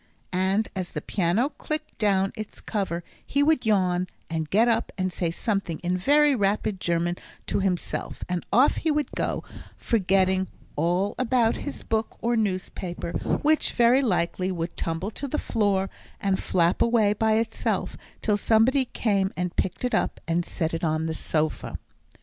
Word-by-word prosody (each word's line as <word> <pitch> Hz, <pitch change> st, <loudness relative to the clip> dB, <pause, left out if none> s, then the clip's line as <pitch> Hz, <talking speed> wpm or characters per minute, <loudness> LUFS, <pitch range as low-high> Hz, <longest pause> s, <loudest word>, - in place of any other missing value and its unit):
And 190 Hz, +4 st, +2 dB
as 185 Hz, -2 st, -4 dB
the 150 Hz, -, -2 dB
piano 195 Hz, -, +1 dB
clicked 310 Hz, 0 st, -5 dB
down 195 Hz, -3 st, +2 dB
its 215 Hz, -1 st, -6 dB
cover, 190 Hz, -5 st, -2 dB, 0.2 s
he 285 Hz, +1 st, +1 dB
would 300 Hz, -6 st, +2 dB
yawn, 185 Hz, -3 st, +2 dB, 0.2 s
and 160 Hz, -2 st, -2 dB
get 225 Hz, +4 st, +4 dB
up 230 Hz, -1 st, +1 dB
and 185 Hz, -1 st, -1 dB
say 170 Hz, -, 0 dB
something 195 Hz, -2 st, -1 dB
in 180 Hz, +1 st, +1 dB
very 290 Hz, +10 st, +4 dB
rapid 205 Hz, -3 st, 0 dB
German 170 Hz, 0 st, 0 dB, 0.3 s
to -, -, 0 dB
himself, 190 Hz, -3 st, -2 dB
and 180 Hz, -1 st, -2 dB
off 260 Hz, +4 st, +5 dB
he 325 Hz, -, 0 dB
would 300 Hz, -1 st, 0 dB
go, -, -, -2 dB, 0.3 s
forgetting 190 Hz, -3 st, +2 dB, 0.3 s
all 175 Hz, +6 st, +1 dB
about 245 Hz, -2 st, +2 dB
his 285 Hz, -, -6 dB
book 220 Hz, 0 st, -1 dB
or 235 Hz, +1 st, +1 dB
newspaper, 185 Hz, -4 st, -2 dB, 0.3 s
which, 310 Hz, +1 st, +3 dB
very 240 Hz, +2 st, +5 dB
likely, 185 Hz, -4 st, 0 dB
would 170 Hz, -1 st, -3 dB
tumble 165 Hz, +5 st, -2 dB
to 280 Hz, -, -5 dB
the 300 Hz, -, -2 dB
floor, 200 Hz, -3 st, +1 dB, 0.3 s
and 195 Hz, -1 st, 0 dB
flap 170 Hz, -1 st, +2 dB
away 225 Hz, -3 st, +4 dB
by 220 Hz, +1 st, +2 dB
itself 225 Hz, 0 st, 0 dB, 0.3 s
till 210 Hz, -2 st, +2 dB
somebody 235 Hz, +6 st, +3 dB
came 200 Hz, -5 st, 0 dB
and 180 Hz, -1 st, -2 dB
picked 190 Hz, +7 st, -1 dB
it 250 Hz, -, -1 dB
up -, -, 0 dB
and 170 Hz, +1 st, +1 dB
set 160 Hz, -1 st, -2 dB
it 165 Hz, +2 st, -3 dB
on 155 Hz, 0 st, +1 dB
the 160 Hz, -, -1 dB
sofa. 155 Hz, 0 st, -1 dB
195 Hz, 165 wpm, -26 LUFS, 180-230 Hz, 0.3 s, off